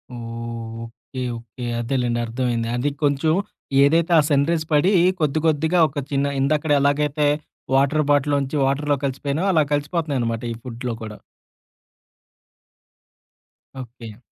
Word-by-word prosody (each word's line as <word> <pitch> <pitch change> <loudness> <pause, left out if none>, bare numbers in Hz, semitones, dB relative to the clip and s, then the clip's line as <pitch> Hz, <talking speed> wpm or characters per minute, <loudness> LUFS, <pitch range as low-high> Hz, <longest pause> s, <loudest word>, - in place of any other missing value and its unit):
ఓహ్! - - -7 0.6
Okay. 115 +3 -9 0.2
Okay. 120 +2 -11 0.2
అదేలెండి. 120 -1 -1
అర్థమైంది. 115 -1 -1
అది 125 +4 0
కొంచెం 145 +2 +2 0.5
ఏదైతే 165 +4 +3
ఆ - - +6
సన్ 140 -1 +3
రేస్ 165 -2 0
పడి 150 +6 +4 0.3
కొద్ది 155 -1 +1
కొద్దిగా 160 +3 +2
ఒక 145 -1 -5
చిన్న 140 0 +1
ఇందాక 150 +3 +1
ఎలాగైతే 145 +1 +1 0.5
వాటర్ 140 +3 +3
బాటిల్‌లోంచి 145 0 +1
వాటర్‌లోకి 145 +1 0
కలిసిపోయాయో, 140 +6 -2
అలా 155 -2 +4
కలిసిపోతున్నాయనమాట 145 -6 -1
ఈ - - -2
ఫుడ్‌లో 120 -1 -5
కూడా. 105 -1 -7 2.6
ఓకే. 115 -3 -10
140 Hz, 115 wpm, -22 LUFS, 125-150 Hz, 2.6 s, ఆ